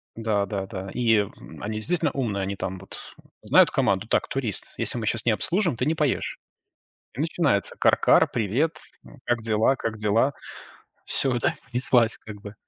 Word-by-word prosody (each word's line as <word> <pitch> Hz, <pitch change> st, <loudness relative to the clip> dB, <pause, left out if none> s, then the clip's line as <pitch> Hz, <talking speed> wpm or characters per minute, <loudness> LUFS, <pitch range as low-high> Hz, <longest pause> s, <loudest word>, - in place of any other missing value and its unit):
Да-да-да. 100 Hz, -3 st, -2 dB
И, 115 Hz, -2 st, +3 dB
м, 100 Hz, -, -6 dB
они, 110 Hz, +1 st, -4 dB
действительно, 170 Hz, +10 st, 0 dB
умные, 110 Hz, -8 st, -2 dB
они 100 Hz, +1 st, -3 dB
там 95 Hz, -1 st, -5 dB
вот 95 Hz, -, -11 dB, 0.5 s
знают -, -, +5 dB
команду 100 Hz, +2 st, +1 dB
так, -, -, +1 dB
турист. 120 Hz, -8 st, -3 dB
Если -, -, -2 dB
мы 115 Hz, -, -3 dB
сейчас 115 Hz, +1 st, -1 dB
не 120 Hz, -, +4 dB
обслужим, 170 Hz, -, 0 dB
ты 125 Hz, -, 0 dB
не 155 Hz, +3 st, +1 dB
поешь. 150 Hz, -4 st, -1 dB, 0.7 s
И 120 Hz, -, -10 dB
начинается: 150 Hz, -, 0 dB
"Кар-кар, -, -, +4 dB
привет, 125 Hz, +9 st, 0 dB, 0.5 s
как 120 Hz, -1 st, 0 dB
дела, 110 Hz, +3 st, +2 dB
как 115 Hz, -4 st, -4 dB
дела?" 110 Hz, +6 st, +2 dB, 0.7 s
Всё, 130 Hz, -3 st, +1 dB
да, -, -, +2 dB
и 115 Hz, -, -17 dB
понеслась, 120 Hz, -2 st, +3 dB
как 105 Hz, -2 st, -11 dB
бы 105 Hz, -1 st, -9 dB
115 Hz, 165 wpm, -25 LUFS, 105-130 Hz, 0.7 s, знают